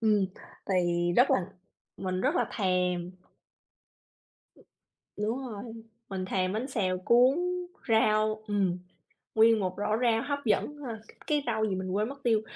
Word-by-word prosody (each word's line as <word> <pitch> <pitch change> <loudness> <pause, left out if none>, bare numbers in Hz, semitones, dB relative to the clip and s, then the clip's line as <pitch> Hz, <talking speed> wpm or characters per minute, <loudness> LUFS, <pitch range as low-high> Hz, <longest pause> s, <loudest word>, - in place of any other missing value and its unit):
Ừm, 210 -4 +3 0.4
thì 175 -2 +1
rất 250 +3 +5
là - - +4 0.6
mình 185 -1 -2
rất 290 +6 +1
là - - +2
thèm. 180 -3 0 2.1
Đúng 215 +5 -1
rồi, 235 -7 -6 0.5
mình 190 -1 -3
thèm 185 0 0
bánh 235 +6 -2
xèo 185 -7 0
cuốn 250 - +4 0.5
rau, 215 -1 +3
ừm, 195 -4 0 0.6
nguyên 225 0 +6
một 185 -2 -1
rổ 210 +1 0
rau 230 -2 +3
hấp 285 0 -2
dẫn 230 +7 +1
ha! 225 -3 -5 0.3
Cái 295 -2 +1
rau 220 -2 0
gì 195 - -1
mình 185 0 -4
quên 210 +5 0
mất 275 0 -10
tiêu, 225 -3 +3
215 Hz, 150 wpm, -29 LUFS, 185-235 Hz, 2.1 s, nguyên